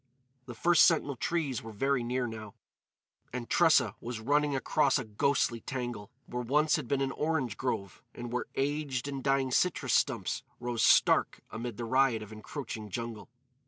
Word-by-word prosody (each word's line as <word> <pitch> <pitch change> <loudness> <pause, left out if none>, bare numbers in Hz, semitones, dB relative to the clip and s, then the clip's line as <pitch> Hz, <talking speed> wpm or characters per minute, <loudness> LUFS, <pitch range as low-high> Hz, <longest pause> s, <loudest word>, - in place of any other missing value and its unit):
The 120 - -7
first 170 +8 +5
sentinel 150 -4 +1
trees 140 -2 -1
were 115 -1 -9
very 135 +5 0
near, 125 +1 -1
now; 110 -3 -7 0.8
and 125 -1 -5
Tressa 145 - +4
was 120 -1 -5
running 145 +4 +1
across 135 +1 +2
a 130 - -2
ghostly 115 +2 +1
tangle, 120 -6 -5 0.2
where 125 - -4
once 150 +6 +2
had - - -3
been 135 +3 0
an 135 0 0
orange 150 -8 -1
grove, 100 -7 -3
and 120 0 -6
where 125 - -1
aged 140 -2 -1
and 135 -2 -5
dying 135 -1 +1
citrus 180 +7 +1
stumps - - +1 0.2
rose 120 -1 -2
stark - - +4
amid 115 -1 -5
the 120 - -4
riot 130 -2 +2
of 105 - -12
encroaching 110 -1 -7
jungle. 115 +1 -6
125 Hz, 165 wpm, -30 LUFS, 115-140 Hz, 0.8 s, first